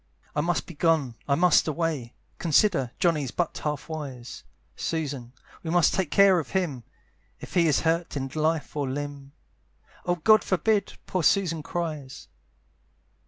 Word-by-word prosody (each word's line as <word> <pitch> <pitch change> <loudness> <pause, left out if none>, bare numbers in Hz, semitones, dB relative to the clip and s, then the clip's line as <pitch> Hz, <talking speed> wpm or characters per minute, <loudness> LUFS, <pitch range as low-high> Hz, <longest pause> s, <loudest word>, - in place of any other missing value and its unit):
"I 150 - +2
must 175 +2 0
be 170 - -10
gone, 155 -5 +1
I 140 - +3
must 175 +1 +4
away, 155 -6 -2 0.2
"Consider, 165 - +3
Johnny's 155 -7 +1
but 170 +6 -2
half 150 -2 -3
wise; 140 -7 -7 0.3
"Susan, 140 -7 -3 0.3
we 160 - -5
must 175 -1 +4
take 185 -4 0
care 195 0 +5
of 160 - -6
him, 160 -11 -1 0.6
"If - - -10
he 170 -2 +4
is 150 - +3
hurt 165 -1 0
in 135 -1 -2
life 155 0 -1
or 145 -3 -1
limb" 140 0 -6 0.7
"Oh 175 - +1
God 215 +6 +5
forbid!" 200 +2 +1
poor 185 - -1
Susan 165 -2 +2
cries. 150 -5 -5
160 Hz, 150 wpm, -26 LUFS, 140-175 Hz, 0.7 s, care